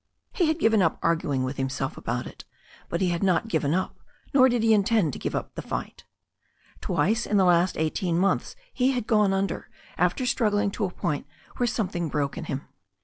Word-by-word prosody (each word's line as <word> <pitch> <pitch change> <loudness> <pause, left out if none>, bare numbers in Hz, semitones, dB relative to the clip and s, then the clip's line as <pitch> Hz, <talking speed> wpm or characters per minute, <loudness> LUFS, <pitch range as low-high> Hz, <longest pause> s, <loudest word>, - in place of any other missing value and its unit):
He 350 - +1
had 315 0 +1
gfiven 225 -8 +3
up 165 -3 +2
arguing 155 -5 +1
with 130 +1 -3
himself 135 0 -2
about 120 +1 -3
it, - - -10 0.5
but 170 - -2
he 185 - +2
had 170 -1 -1
not 190 +2 +2
given 155 -4 +1
up, 185 - -2 0.3
nor 260 -2 +6
did 240 -2 +1
he 225 -1 +5
intend 210 - +2
to - - -6
give - - -3
up - - -4
the - - -5
fight. - - -6 0.8
Twice 225 +4 +1
in 210 - +2
the 190 - +4
last 175 +1 +3
eighteen 165 +2 0
months 195 +2 +1 0.2
he 260 +1 +2
had 245 -4 -2
gone 210 -3 +3
under, 195 +1 -2 0.3
after 255 - +1
struggling 210 -5 +1
to 205 - -2
a - - -2
point 150 -4 -3 0.3
where 245 - +1
something 185 -7 -2
broke 145 -1 -1
in - - -5
him. 135 0 -5
190 Hz, 205 wpm, -26 LUFS, 160-225 Hz, 0.8 s, nor